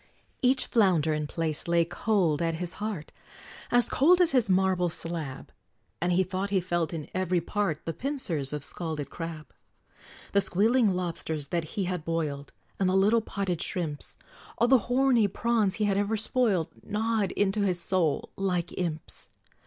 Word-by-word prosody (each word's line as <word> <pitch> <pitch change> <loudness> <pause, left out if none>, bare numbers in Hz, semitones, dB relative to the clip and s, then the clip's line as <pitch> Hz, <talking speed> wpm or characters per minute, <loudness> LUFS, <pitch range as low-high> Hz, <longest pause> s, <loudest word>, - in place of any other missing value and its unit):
Each 260 +1 +3
flounder 180 -9 +3
and 150 -1 -2
plaice 160 -2 -1
lay 170 -1 +3
cold 175 -4 +1
at 165 -1 0
his 175 +1 -2
heart, 205 -8 -4 0.6
As 245 0 +5
cold 345 +7 +4
as 350 -2 +4
his 250 -6 +3
marble 185 -1 +2
slab; 160 -5 -4 0.5
And 175 +1 +1
he 180 +2 +3
thought 185 +2 -3
he 195 -1 +2
felt, 175 -2 -1
in 160 -4 -5
every 185 -1 +1
part, 170 -2 -2
The 165 - -2
pincers 185 - -2
of 150 -1 -4
scalded 155 -3 -4
crab. 160 -4 -7 0.8
The 200 - +4
squealing 210 +2 +2
lobsters 160 -5 -4
that 170 +3 -3
he 200 - +1
had 180 -3 -3
boiled, 155 -4 -3 0.3
And 190 -2 +2
the 185 - +1
little 210 +4 +4
potted 195 -5 -3
shrimps, 165 -7 -3 0.4
All 235 - +3
the 260 0 +6
horny 250 -4 +4
prawns 220 -1 +1
he 215 - -1
had 200 -1 +1
ever 205 +2 0
spoiled, 220 - +1
Gnawed 220 -1 -1
into 205 +1 +1
his 180 -3 +1
soul, 170 -4 0
like 180 -3 -1
imps! 165 -4 -4
185 Hz, 165 wpm, -28 LUFS, 165-210 Hz, 0.8 s, the